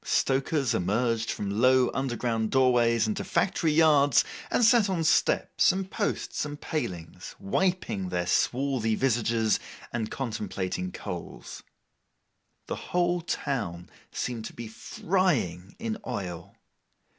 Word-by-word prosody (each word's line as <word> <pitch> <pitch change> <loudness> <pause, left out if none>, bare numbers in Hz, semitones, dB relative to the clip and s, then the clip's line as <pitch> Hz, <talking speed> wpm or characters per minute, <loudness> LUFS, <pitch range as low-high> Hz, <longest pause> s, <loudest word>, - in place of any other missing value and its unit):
Stokers 135 -1 +1
emerged 115 +4 0
from 100 +2 -2
low 130 -1 +5
underground 120 -4 -1
doorways 120 -3 +3
into 215 -2 -2
factory 170 -4 +1
yards, 150 -4 +5 0.2
and 240 - +3
sat 225 -3 +5
on 175 -4 0
steps, 160 - +3
and 190 +1 -4
posts, 210 - -2
and 145 0 -6
palings, 90 - -5
wiping 140 - -1
their 90 -1 -1
swarthy 125 +2 +1
visages, 115 -3 +1 0.3
and 115 -2 -2
contemplating 100 -7 -3
coals. - - -7 1.0
The - - -3
whole 175 0 +1
town 105 - -3 0.2
seemed 115 -3 -3
to - - -7
be 115 -1 -7
frying 110 - -1
in 225 -1 -4
oil. 90 -8 -5
125 Hz, 115 wpm, -27 LUFS, 110-155 Hz, 1.0 s, low